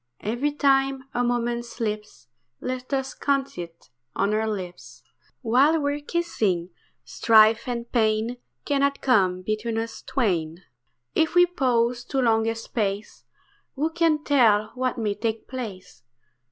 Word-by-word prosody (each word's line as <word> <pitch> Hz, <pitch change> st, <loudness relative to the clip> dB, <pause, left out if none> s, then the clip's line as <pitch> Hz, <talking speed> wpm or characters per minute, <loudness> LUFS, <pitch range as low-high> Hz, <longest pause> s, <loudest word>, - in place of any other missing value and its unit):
Every 240 Hz, +7 st, -1 dB
time 270 Hz, -2 st, +2 dB
a 245 Hz, -, 0 dB
moment 240 Hz, 0 st, 0 dB
slips 215 Hz, -, -5 dB, 0.3 s
Let 255 Hz, +1 st, -5 dB
us 270 Hz, -1 st, -1 dB
count 275 Hz, -1 st, -1 dB
it 165 Hz, -6 st, -9 dB, 0.2 s
on 200 Hz, +2 st, +1 dB
our 220 Hz, +1 st, 0 dB
lips 185 Hz, -4 st, -7 dB, 0.4 s
While 270 Hz, +8 st, +4 dB
we're 285 Hz, 0 st, -1 dB
kissing, 215 Hz, -, -1 dB, 0.3 s
strife 220 Hz, +1 st, +4 dB
and 235 Hz, -1 st, -4 dB
pain 220 Hz, +1 st, +1 dB, 0.3 s
Cannot 280 Hz, -1 st, +1 dB
come 185 Hz, -8 st, +2 dB
between 215 Hz, +3 st, -2 dB
us 225 Hz, 0 st, -4 dB
twain. 175 Hz, -8 st, -1 dB, 0.5 s
If 320 Hz, +1 st, +1 dB
we 355 Hz, 0 st, +7 dB
pause 245 Hz, -8 st, 0 dB
too 270 Hz, -, -2 dB
long 225 Hz, -3 st, +2 dB
a 225 Hz, -, 0 dB
space, 210 Hz, -3 st, -4 dB, 0.5 s
Who 305 Hz, +4 st, -1 dB
can 325 Hz, -2 st, +1 dB
tell 220 Hz, -8 st, +3 dB
what 255 Hz, 0 st, -2 dB
may 215 Hz, -3 st, 0 dB
take 220 Hz, +1 st, -3 dB
place? 225 Hz, -8 st, -7 dB
235 Hz, 135 wpm, -25 LUFS, 215-270 Hz, 0.5 s, we